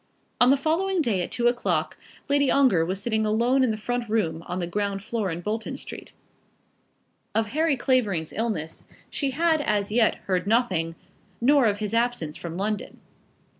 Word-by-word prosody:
On 245 Hz, -, +6 dB
the 275 Hz, -, +5 dB
following 350 Hz, +6 st, 0 dB
day 225 Hz, -, +1 dB
at -, -, -3 dB
two 240 Hz, 0 st, 0 dB
o'clock 240 Hz, 0 st, 0 dB, 0.3 s
Lady 285 Hz, -1 st, +2 dB
Ongar 255 Hz, -12 st, +4 dB
was 185 Hz, +3 st, -2 dB
sitting 220 Hz, 0 st, 0 dB
alone 235 Hz, +5 st, +2 dB
in 255 Hz, -, +2 dB
the 215 Hz, -, -1 dB
front 240 Hz, +1 st, -3 dB
room 185 Hz, -7 st, 0 dB
on 180 Hz, -, -3 dB
the 180 Hz, -, -1 dB
ground 200 Hz, +2 st, -2 dB
floor 220 Hz, -3 st, -2 dB
in 165 Hz, +1 st, -4 dB
Bolton 220 Hz, +4 st, -3 dB
Street. -, -, -9 dB, 1.2 s
Of 220 Hz, -1 st, +1 dB
Harry 310 Hz, -1 st, +1 dB
Clavering's 215 Hz, -, 0 dB
illness 215 Hz, -9 st, -3 dB, 0.3 s
she 280 Hz, -, -1 dB
had 320 Hz, +3 st, +2 dB
as 210 Hz, -5 st, 0 dB
yet 225 Hz, 0 st, +3 dB
heard 185 Hz, -1 st, 0 dB
nothing, 185 Hz, -8 st, +1 dB, 0.4 s
nor 270 Hz, 0 st, +4 dB
of 205 Hz, -1 st, +1 dB
his 210 Hz, 0 st, -3 dB
absence 230 Hz, -10 st, 0 dB
from 170 Hz, 0 st, -6 dB
London. 210 Hz, +2 st, -3 dB
220 Hz, 170 wpm, -25 LUFS, 195-255 Hz, 1.2 s, On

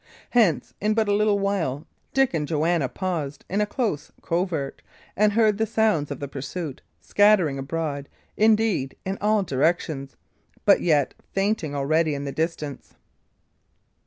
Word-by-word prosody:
Hence, 215 Hz, -, +2 dB
in 215 Hz, +1 st, +1 dB
but 220 Hz, -1 st, +2 dB
a 205 Hz, -, +2 dB
little 210 Hz, 0 st, +3 dB
while, 175 Hz, -8 st, -1 dB, 0.3 s
Dick 270 Hz, -4 st, +2 dB
and 150 Hz, -3 st, -1 dB
Joanna 160 Hz, -2 st, +1 dB
paused, 165 Hz, -7 st, -4 dB
in 200 Hz, +3 st, 0 dB
a 210 Hz, -, +1 dB
close 210 Hz, -, -2 dB
covert, 170 Hz, -5 st, -2 dB, 0.3 s
and 210 Hz, +1 st, +3 dB
heard 215 Hz, -2 st, +3 dB
the 220 Hz, -, +1 dB
sounds 215 Hz, -9 st, +1 dB
of 140 Hz, -, -5 dB
the 140 Hz, -, -4 dB
pursuit, 140 Hz, +2 st, -6 dB, 0.2 s
scattering 195 Hz, -9 st, +3 dB
abroad, 145 Hz, 0 st, -3 dB, 0.3 s
indeed, 215 Hz, -10 st, +2 dB
in 190 Hz, +1 st, -3 dB
all 210 Hz, 0 st, +2 dB
directions, 150 Hz, -2 st, -1 dB, 0.5 s
but -, -, +6 dB
yet 150 Hz, -5 st, +2 dB, 0.2 s
fainting 195 Hz, -7 st, 0 dB
already 155 Hz, +2 st, +1 dB
in 140 Hz, 0 st, -4 dB
the 140 Hz, -, -3 dB
distance. 155 Hz, -2 st, -4 dB
170 Hz, 145 wpm, -24 LUFS, 145-210 Hz, 0.5 s, but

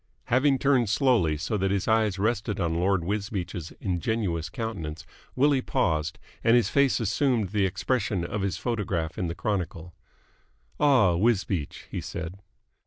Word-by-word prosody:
Having 135 Hz, +2 st, +4 dB
turned 130 Hz, -5 st, +2 dB
slowly 105 Hz, -, +3 dB
so 95 Hz, +7 st, -2 dB
that 95 Hz, 0 st, 0 dB
his 100 Hz, -1 st, -1 dB
eyes 110 Hz, -3 st, +2 dB
rested 105 Hz, 0 st, -1 dB
on 85 Hz, -3 st, 0 dB
Lord 95 Hz, -1 st, +2 dB
Wisbeach's 95 Hz, -4 st, -3 dB
ingenuous 90 Hz, -3 st, -1 dB
countenance, 80 Hz, -6 st, -5 dB, 0.3 s
Willie 140 Hz, 0 st, +3 dB
paused, 80 Hz, -8 st, 0 dB, 0.3 s
and 115 Hz, +1 st, +5 dB
his 120 Hz, -5 st, +3 dB
face 140 Hz, -2 st, +3 dB
assumed 115 Hz, -1 st, +1 dB
the 100 Hz, -1 st, +1 dB
expression 95 Hz, -1 st, -1 dB
of 105 Hz, +4 st, -3 dB
his 95 Hz, -2 st, -1 dB
photograph 95 Hz, -9 st, -2 dB
in 90 Hz, -, -1 dB
the 85 Hz, -, -4 dB
Chronicle. 90 Hz, -5 st, -3 dB, 0.9 s
"Ah, 130 Hz, -11 st, +5 dB
Wisbeach!" 95 Hz, -5 st, 0 dB
he -, -, -3 dB
said. 85 Hz, +3 st, -6 dB
100 Hz, 145 wpm, -27 LUFS, 85-115 Hz, 0.9 s, and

